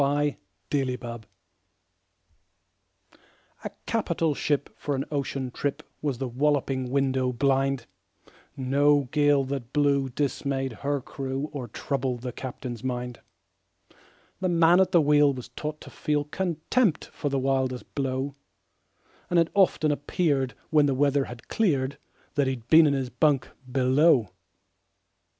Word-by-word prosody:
Y 145 Hz, +1 st, +1 dB, 0.4 s
Z 145 Hz, -, +3 dB
A -, -, 0 dB
Nautical 130 Hz, -1 st, -2 dB
Ballad 120 Hz, -3 st, -8 dB, 2.4 s
A -, -, -3 dB, 0.2 s
CAPITAL 160 Hz, -2 st, 0 dB
ship 145 Hz, 0 st, -1 dB
for 145 Hz, -, -2 dB
an 135 Hz, -, -2 dB
ocean 135 Hz, -3 st, -2 dB
trip 145 Hz, +3 st, -3 dB, 0.2 s
Was 145 Hz, -4 st, -1 dB
The 135 Hz, +1 st, -3 dB
Walloping 135 Hz, 0 st, 0 dB
Window 130 Hz, -1 st, +1 dB
blind 135 Hz, 0 st, +1 dB, 0.7 s
No 140 Hz, +2 st, +3 dB
gale 145 Hz, -2 st, +4 dB
that 135 Hz, -2 st, -5 dB
blew 140 Hz, -2 st, +2 dB
dismayed 135 Hz, 0 st, -2 dB
her 145 Hz, -1 st, 0 dB
crew 135 Hz, +3 st, -4 dB
Or 130 Hz, -4 st, -5 dB
troubled 130 Hz, +1 st, -2 dB
the 125 Hz, 0 st, -4 dB
captain's 125 Hz, -1 st, -6 dB
mind. 125 Hz, -2 st, -3 dB, 1.2 s
The 185 Hz, 0 st, 0 dB
man 170 Hz, +1 st, +5 dB
at 190 Hz, -1 st, +3 dB
the 170 Hz, -, +5 dB
wheel 145 Hz, -1 st, +4 dB
was 125 Hz, -, -8 dB
taught 150 Hz, 0 st, -5 dB
to -, -, -11 dB
feel 150 Hz, -2 st, 0 dB
Contempt 170 Hz, -, 0 dB
for 145 Hz, -, -2 dB
the 140 Hz, -, 0 dB
wildest 130 Hz, -1 st, -1 dB
blow, 135 Hz, 0 st, -2 dB, 1.0 s
And 175 Hz, -, +2 dB
it 165 Hz, -1 st, +3 dB
often 185 Hz, -6 st, +3 dB
appeared, 145 Hz, -2 st, 0 dB, 0.2 s
when 150 Hz, -2 st, +5 dB
the 135 Hz, -, +1 dB
weather 140 Hz, 0 st, +2 dB
had 120 Hz, -1 st, -10 dB
cleared, 140 Hz, -9 st, 0 dB, 0.3 s
That 145 Hz, -3 st, +1 dB
he'd 125 Hz, -3 st, -4 dB
been 160 Hz, 0 st, +8 dB
in 145 Hz, -, +2 dB
his 130 Hz, -2 st, -2 dB
bunk 145 Hz, -3 st, +2 dB, 0.2 s
below. 130 Hz, -, +4 dB
140 Hz, 140 wpm, -26 LUFS, 130-150 Hz, 2.4 s, been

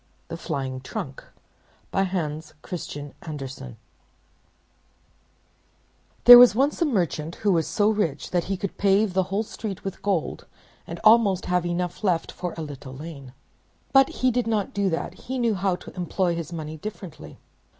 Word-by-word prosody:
THE 165 Hz, -, -4 dB
FLYING 135 Hz, -6 st, -4 dB
TRUNK 130 Hz, 0 st, -6 dB, 0.7 s
By 195 Hz, -, +2 dB
Hans 155 Hz, -4 st, -4 dB
Christian 145 Hz, -5 st, -6 dB
Andersen 135 Hz, -, -7 dB, 2.5 s
There 245 Hz, 0 st, +12 dB
was 245 Hz, -3 st, +8 dB
once 280 Hz, +7 st, +1 dB
a -, -, +4 dB
merchant, 170 Hz, -, -1 dB
who 205 Hz, -, +5 dB
was 165 Hz, -3 st, +1 dB
so 205 Hz, -, +1 dB
rich 170 Hz, -9 st, -2 dB
that 175 Hz, -1 st, +1 dB
he 195 Hz, 0 st, -2 dB
could 200 Hz, 0 st, -5 dB
pave 200 Hz, 0 st, +3 dB
the 190 Hz, -, +3 dB
whole 200 Hz, +3 st, 0 dB
street 210 Hz, -3 st, -6 dB
with 195 Hz, -1 st, -6 dB
gold, 195 Hz, -5 st, -2 dB, 0.4 s
and 165 Hz, +1 st, -6 dB
almost 215 Hz, -4 st, +5 dB
have 180 Hz, -1 st, 0 dB
enough 175 Hz, +3 st, -3 dB
left 175 Hz, -5 st, +1 dB
for 180 Hz, -2 st, -5 dB
a 160 Hz, -, -4 dB
little 140 Hz, -3 st, -9 dB
lane. 140 Hz, -3 st, -9 dB, 0.6 s
But 270 Hz, -1 st, +6 dB
he 255 Hz, 0 st, +1 dB
did 245 Hz, -1 st, 0 dB
not 215 Hz, -4 st, -1 dB
do 200 Hz, -1 st, +1 dB
that; 165 Hz, -, -3 dB
he 260 Hz, +1 st, -6 dB
knew 235 Hz, -3 st, +2 dB
how 190 Hz, -1 st, 0 dB
to -, -, -12 dB
employ 180 Hz, 0 st, 0 dB
his 165 Hz, -1 st, -5 dB
money 160 Hz, -2 st, -6 dB
differently. 170 Hz, -, -9 dB
180 Hz, 160 wpm, -25 LUFS, 155-205 Hz, 2.5 s, There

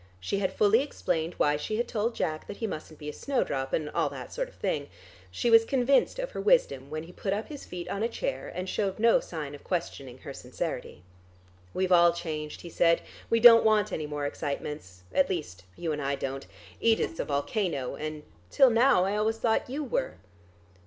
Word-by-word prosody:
She 95 Hz, -, -2 dB
had 190 Hz, -2 st, 0 dB
fully 215 Hz, +3 st, +4 dB
explained 170 Hz, -, -2 dB
why 145 Hz, 0 st, +2 dB
she 180 Hz, +8 st, -3 dB
had 240 Hz, -, 0 dB
told 225 Hz, +1 st, -1 dB
Jack 155 Hz, -1 st, -2 dB
that 205 Hz, -, -7 dB
he 225 Hz, -, -3 dB
mustn't 155 Hz, -5 st, -6 dB
be 150 Hz, -, -9 dB
a 150 Hz, -, -4 dB
snowdrop, 140 Hz, -, -1 dB
and 155 Hz, -, 0 dB
all -, -, +1 dB
that -, -, -8 dB
sort -, -, -2 dB
of -, -, -20 dB
thing. 150 Hz, -7 st, -2 dB, 0.4 s
She 230 Hz, -, 0 dB
was 225 Hz, 0 st, +8 dB
convinced 265 Hz, -, +2 dB
of -, -, -3 dB
her -, -, -4 dB
wisdom 140 Hz, -, +2 dB
when 155 Hz, 0 st, -4 dB
he 170 Hz, -, -11 dB
put 195 Hz, +2 st, -2 dB
up 210 Hz, +2 st, -4 dB
his 290 Hz, -2 st, -8 dB
feet 175 Hz, -1 st, -7 dB
on 200 Hz, -, -3 dB
a 230 Hz, -, +2 dB
chair, -, -, -4 dB
and 185 Hz, +1 st, -3 dB
showed 195 Hz, 0 st, -1 dB
no 230 Hz, +1 st, +5 dB
sign 150 Hz, -4 st, -6 dB
of 145 Hz, -, -11 dB
questioning 135 Hz, -8 st, -4 dB
her 140 Hz, -, -9 dB
sincerity. 125 Hz, -, -5 dB, 0.7 s
"We've 185 Hz, -, -1 dB
all 175 Hz, -1 st, +6 dB
changed," 155 Hz, -3 st, -5 dB
he 170 Hz, -, -8 dB
said. 170 Hz, 0 st, +3 dB, 0.3 s
"We 230 Hz, -, +3 dB
don't 230 Hz, 0 st, +9 dB
want 215 Hz, -1 st, +3 dB
any 155 Hz, -1 st, -2 dB
more 145 Hz, -1 st, -3 dB
excitements. 140 Hz, -10 st, -5 dB
At 280 Hz, -, +3 dB
least 95 Hz, -, -4 dB
you 165 Hz, -2 st, -3 dB
and 150 Hz, -1 st, -2 dB
I 140 Hz, 0 st, 0 dB
don't. 135 Hz, 0 st, -5 dB, 0.3 s
Edith's 230 Hz, +8 st, +1 dB
a -, -, -1 dB
volcano, 145 Hz, -, -1 dB
and 155 Hz, 0 st, -5 dB, 0.3 s
till 260 Hz, -, +5 dB
now, 235 Hz, -4 st, +4 dB
I 200 Hz, +2 st, 0 dB
always 220 Hz, +1 st, +1 dB
thought 225 Hz, +1 st, +1 dB
you 285 Hz, +4 st, -3 dB
were." 260 Hz, -, -2 dB
180 Hz, 205 wpm, -28 LUFS, 150-225 Hz, 0.7 s, don't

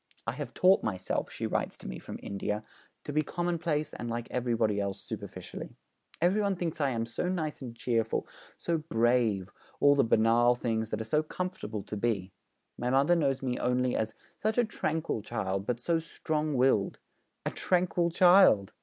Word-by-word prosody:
'I -, -, 0 dB
have -, -, -6 dB
taught 185 Hz, +1 st, +5 dB
myself,' 95 Hz, -4 st, -2 dB
she -, -, -4 dB
writes -, -, -1 dB
to -, -, -9 dB
me 60 Hz, -, -5 dB
from -, -, -7 dB
India, 105 Hz, +2 st, -3 dB, 0.4 s
'to 145 Hz, -, -5 dB
be 155 Hz, -, +3 dB
commonplace 170 Hz, -2 st, -1 dB
and 120 Hz, -, -5 dB
like 115 Hz, 0 st, -3 dB
everybody 115 Hz, -4 st, +1 dB
else 100 Hz, 0 st, -3 dB
superficially. 100 Hz, -4 st, -7 dB, 0.4 s
Every 185 Hz, +5 st, +3 dB
one 200 Hz, -1 st, +1 dB
thinks 170 Hz, -3 st, -3 dB
I 140 Hz, -, +3 dB
am 115 Hz, -3 st, -1 dB
so 115 Hz, +10 st, -2 dB
nice 160 Hz, -6 st, -2 dB
and 120 Hz, -3 st, -7 dB
cheerful, 115 Hz, -2 st, 0 dB, 0.3 s
so 170 Hz, -1 st, -1 dB
"brave," 115 Hz, -, +1 dB, 0.3 s
all 145 Hz, -, +6 dB
the 140 Hz, -, +4 dB
banal 115 Hz, +2 st, +4 dB
things 110 Hz, -2 st, -1 dB
that 110 Hz, -, -2 dB
are -, -, -1 dB
so 150 Hz, +8 st, +2 dB
comfortable 170 Hz, -, -4 dB
to -, -, -6 dB
be. 100 Hz, -4 st, -1 dB, 0.5 s
My 125 Hz, -, -1 dB
mother 140 Hz, +6 st, +4 dB
knows 140 Hz, -5 st, +1 dB
me 125 Hz, -2 st, -1 dB
only 125 Hz, 0 st, +1 dB
as 110 Hz, 0 st, -1 dB, 0.2 s
"such 215 Hz, +2 st, 0 dB
a 245 Hz, -, +4 dB
tranquil 160 Hz, -, -2 dB
child, 100 Hz, -3 st, -3 dB
but 120 Hz, -1 st, -1 dB
so 165 Hz, +6 st, +1 dB
strong 155 Hz, -2 st, -2 dB
willed." 125 Hz, -6 st, +2 dB, 0.5 s
A -, -, 0 dB
tranquil 175 Hz, -1 st, +1 dB
child!' 175 Hz, -, +6 dB
125 Hz, 180 wpm, -30 LUFS, 110-165 Hz, 0.5 s, all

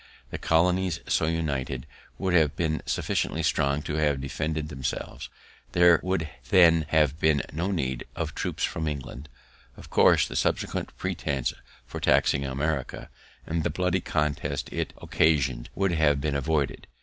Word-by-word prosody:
The -, -, -5 dB
colonies, 90 Hz, +1 st, +2 dB
so 80 Hz, -, +2 dB
united, 70 Hz, -6 st, -2 dB, 0.3 s
would 95 Hz, -2 st, -1 dB
have 80 Hz, -4 st, +3 dB
been 80 Hz, -2 st, -1 dB
sufficiently 80 Hz, -, -1 dB
strong 70 Hz, -2 st, +1 dB
to 75 Hz, 0 st, -3 dB
have 75 Hz, -3 st, +1 dB
defended 75 Hz, +3 st, -3 dB
themselves; 65 Hz, -3 st, -5 dB, 0.4 s
there 85 Hz, -1 st, +6 dB
would 90 Hz, -3 st, -1 dB, 0.2 s
then 85 Hz, -5 st, +5 dB
have 75 Hz, -1 st, +2 dB
been 75 Hz, -3 st, +3 dB
no 85 Hz, +5 st, -1 dB
need 65 Hz, -10 st, -2 dB
of -, -, -3 dB
troops -, -, -3 dB
from 80 Hz, -1 st, -1 dB
England; 70 Hz, -1 st, -6 dB, 0.5 s
of -, -, -13 dB
course, -, -, +5 dB
the -, -, -8 dB
subsequent -, -, -1 dB
pretence 65 Hz, -4 st, -2 dB, 0.3 s
for -, -, -7 dB
taxing 70 Hz, -, +3 dB
America, 70 Hz, +1 st, -3 dB, 0.3 s
and 80 Hz, 0 st, -1 dB
the 85 Hz, -, +1 dB
bloody 90 Hz, +3 st, 0 dB
contest 75 Hz, -3 st, -2 dB
it -, -, -2 dB
occasioned, 70 Hz, -6 st, +1 dB
would 95 Hz, +1 st, +1 dB
have 80 Hz, -4 st, +3 dB
been 75 Hz, +1 st, -1 dB
avoided. 70 Hz, 0 st, -1 dB
75 Hz, 150 wpm, -27 LUFS, 70-80 Hz, 0.5 s, there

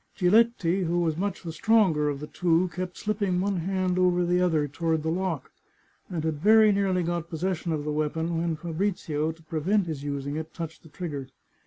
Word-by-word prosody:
Giletti, 195 Hz, -2 st, +3 dB
who 170 Hz, +1 st, +1 dB
was 160 Hz, -2 st, +1 dB
much 195 Hz, +4 st, -3 dB
the 165 Hz, -, -4 dB
stronger 165 Hz, -6 st, +3 dB
of 140 Hz, -1 st, -3 dB
the 150 Hz, -, -5 dB
two, 170 Hz, +3 st, +1 dB
kept 180 Hz, +1 st, -5 dB
slipping 200 Hz, -4 st, 0 dB
one 195 Hz, 0 st, 0 dB
hand 185 Hz, +1 st, 0 dB
over 180 Hz, -1 st, +3 dB
the 180 Hz, +1 st, +2 dB
other 160 Hz, -5 st, +2 dB
toward 160 Hz, +2 st, -1 dB
the 160 Hz, -, 0 dB
lock, 175 Hz, -5 st, -2 dB, 0.6 s
and 170 Hz, -4 st, -3 dB
had 160 Hz, -2 st, -1 dB
very 215 Hz, +4 st, +6 dB
nearly 195 Hz, -2 st, +1 dB
got 170 Hz, 0 st, -2 dB
possession 175 Hz, +1 st, -2 dB
of 155 Hz, -2 st, -1 dB
the 150 Hz, 0 st, -2 dB
weapon 160 Hz, +2 st, -1 dB
when 165 Hz, -1 st, 0 dB
Fa 165 Hz, +2 st, -6 dB
brizio, 160 Hz, -4 st, -1 dB
to 165 Hz, 0 st, -16 dB
prevent 175 Hz, +6 st, 0 dB
his 155 Hz, -4 st, -5 dB
using 140 Hz, 0 st, -3 dB
it, 160 Hz, 0 st, -6 dB
touched 165 Hz, -2 st, -6 dB
the 160 Hz, -, -16 dB
trigger. 145 Hz, -4 st, -5 dB
170 Hz, 200 wpm, -27 LUFS, 155-185 Hz, 0.6 s, very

